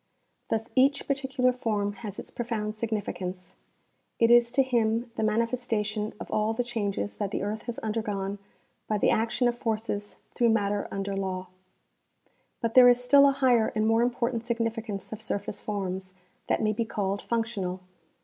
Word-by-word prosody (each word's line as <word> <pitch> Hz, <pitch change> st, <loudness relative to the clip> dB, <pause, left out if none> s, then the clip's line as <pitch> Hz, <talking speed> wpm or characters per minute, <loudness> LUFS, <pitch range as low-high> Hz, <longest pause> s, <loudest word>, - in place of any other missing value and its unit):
Thus 225 Hz, +1 st, -1 dB
each 275 Hz, +2 st, +3 dB
particular 265 Hz, -2 st, +1 dB
form 210 Hz, -5 st, -1 dB
has 205 Hz, -1 st, -8 dB
its -, -, -8 dB
|)rofound 230 Hz, -3 st, -3 dB
signifi 215 Hz, -1 st, -3 dB
cance; 180 Hz, 0 st, -6 dB, 0.6 s
it 230 Hz, 0 st, +4 dB
is 240 Hz, 0 st, +6 dB
to 270 Hz, -, +4 dB
him 235 Hz, -2 st, 0 dB
the -, -, -3 dB
manifestation 215 Hz, -1 st, 0 dB
of -, -, -8 dB
all 215 Hz, +1 st, +1 dB
the 245 Hz, -, 0 dB
changes 205 Hz, -4 st, -3 dB
that 205 Hz, -2 st, -2 dB
the 200 Hz, -, -3 dB
earth 215 Hz, +2 st, -3 dB
has 240 Hz, -, -3 dB
undergone 205 Hz, -2 st, -2 dB, 0.5 s
by 215 Hz, -, +1 dB
the -, -, +3 dB
action 230 Hz, +3 st, +1 dB
of 240 Hz, -, +1 dB
forces 215 Hz, -3 st, -3 dB, 0.2 s
through 240 Hz, -2 st, +3 dB
matter 205 Hz, -2 st, +1 dB
under 195 Hz, 0 st, -3 dB
law. 185 Hz, -1 st, -3 dB, 1.1 s
But 230 Hz, -1 st, -1 dB
there 250 Hz, -1 st, +9 dB
is 245 Hz, 0 st, +5 dB
still 280 Hz, +2 st, +7 dB
a -, -, +3 dB
higher 255 Hz, -5 st, +3 dB
and 215 Hz, 0 st, +2 dB
more 225 Hz, +1 st, +3 dB
important 240 Hz, -1 st, 0 dB
significance 225 Hz, -4 st, -2 dB
of 220 Hz, -, -7 dB
surface 205 Hz, -2 st, -3 dB
forms, 190 Hz, -2 st, -4 dB, 0.3 s
that -, -, +1 dB
may 215 Hz, 0 st, +2 dB
be 230 Hz, -, 0 dB
called 200 Hz, -3 st, -2 dB
functional. 225 Hz, -6 st, -2 dB
220 Hz, 170 wpm, -28 LUFS, 205-240 Hz, 1.1 s, there